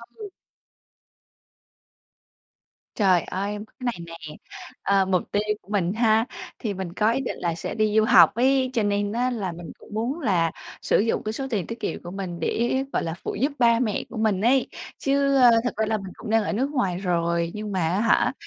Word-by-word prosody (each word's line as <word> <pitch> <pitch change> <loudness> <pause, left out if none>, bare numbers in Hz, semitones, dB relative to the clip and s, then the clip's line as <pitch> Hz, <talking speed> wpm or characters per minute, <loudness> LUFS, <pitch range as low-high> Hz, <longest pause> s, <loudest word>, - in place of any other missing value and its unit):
Ừ. 425 -2 -8 2.7
Trời 185 -5 +4
ơi, 200 +3 -3
có 215 +1 -11
cái - - -28
này 235 -8 -2 0.3
nè, 150 - -9 0.5
ờ, 195 -1 +3
mục 185 -2 +1
tiêu 205 - +1 0.2
của 190 - -24
mình 185 -3 +1
ha, 225 0 +3 0.3
thì 215 -4 -2
mình 185 -3 -5
có 215 +4 +2
ý 270 - 0
định 250 - -4
là 170 -1 -1
sẽ - - -5
đi 215 -1 +1
du 220 - +5
học 215 - +6
ấy, 260 +1 +3
cho 230 -4 +1
nên 205 0 0
á, 245 +3 0
là 210 -7 -3
mình 170 -1 -9
cũng - - -15
muốn 240 +9 -2
là 180 - +1 0.3
sử - - +2
dụng 225 +2 0
cái 215 - -3
số 270 +4 -4
tiền 205 -7 -2
tiết 230 +1 -6
kiệm - - -4
của 175 - -7
mình 185 -3 -5
để, 240 +10 0
gọi - - 0
là, 165 -1 -3
phụ - - -3
giúp 275 +5 0
ba 235 -1 +4
mẹ 220 -5 -1
của 235 - -8
mình 215 -3 +1
ấy. 255 +3 +3 0.3
Chứ 275 0 +1 0.3
thực 245 - -2
ra 220 - +1
là 220 0 0
mình 195 -2 -8
cũng 225 - -9
đang 225 0 +3
ở - - -2
nước 260 +7 0
ngoài 195 -11 0
rồi, 170 -2 0
nhưng 210 0 -5
mà 190 - -1
á 185 +4 0
hả, 230 - +3
215 Hz, 215 wpm, -24 LUFS, 185-235 Hz, 2.7 s, học